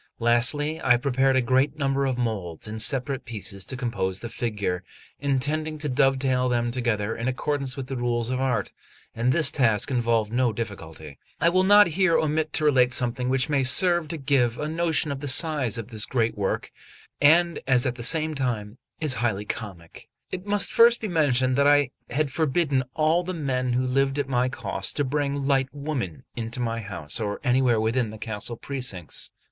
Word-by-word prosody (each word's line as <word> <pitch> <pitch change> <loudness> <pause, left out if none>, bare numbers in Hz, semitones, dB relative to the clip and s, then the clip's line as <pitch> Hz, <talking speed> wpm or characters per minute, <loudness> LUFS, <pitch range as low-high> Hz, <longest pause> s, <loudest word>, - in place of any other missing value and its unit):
Lastly, 145 +7 +1
I 125 -1 +5
prepared 135 +1 +1
a 130 - +3
great 130 +4 +1
number 140 -1 0
of 130 -2 -1
moulds 105 -8 -3
in 110 +1 -6
separate 135 +3 0
pieces 105 -5 -7
to 130 - -6
compose 115 -7 -2
the 120 - -7
figure, 100 -7 -3 0.4
intending 145 +3 -1
to 150 0 -3
dovetail 130 -1 +1
them 120 -1 0
together 115 -4 -1
in 115 - -4
accordance 135 0 -2
with 135 - -4
the 135 - -5
rules 120 -1 -1
of 130 0 -1
art; 130 -2 -1 0.4
and 120 +2 +1
this 155 +2 +3
task 115 -2 +1
involved 115 -3 +1
no 125 -1 +2
difficulty. 80 - -7 0.2
I 165 - +4
will 185 +2 +2
not 205 +2 +7
here 175 0 +2
omit 155 0 0
to 155 - 0
relate 130 -4 +4
something 125 0 0
which 130 +1 +1
may 145 -3 +1
serve 175 +5 +3
to 165 - -4
give 135 -5 +1
a 150 - -3
notion 160 -1 0
of 140 - -4
the 145 - -5
size 140 - +2
of 115 0 -6
this 110 -3 0
great 115 -3 0
work, 100 -2 -2 0.5
and 170 +3 +4
is 125 -2 +3
at 125 - 0
the 125 - -9
same 155 +5 +2
time 120 -5 -3 0.3
highly 115 -6 0
comic. 95 -7 -8 0.2
It 185 +2 -6
must 205 0 +2
first 235 +1 +6
be 215 - -4
mentioned 130 -6 +2
that 140 0 +4
I 145 -3 +4 0.2
had 140 +2 -1
forbidden 145 -3 0
all 155 +3 +2
the 185 +1 -5
men 130 -5 -1
who 130 +1 +1
lived 135 +2 +1
at 145 -2 -1
my 125 -1 +1
cost 100 -5 -3
to 145 - 0
bring 140 0 -2
light 135 -1 +1
women 140 - -5
into 115 +1 -4
my 115 -1 -2
house 95 -8 -2
or 105 -2 -3
anywhere 125 -3 +2
within 115 +1 0
the 110 - -9
castle 110 +1 -3
precincts. 125 - -4
130 Hz, 190 wpm, -25 LUFS, 115-145 Hz, 0.5 s, not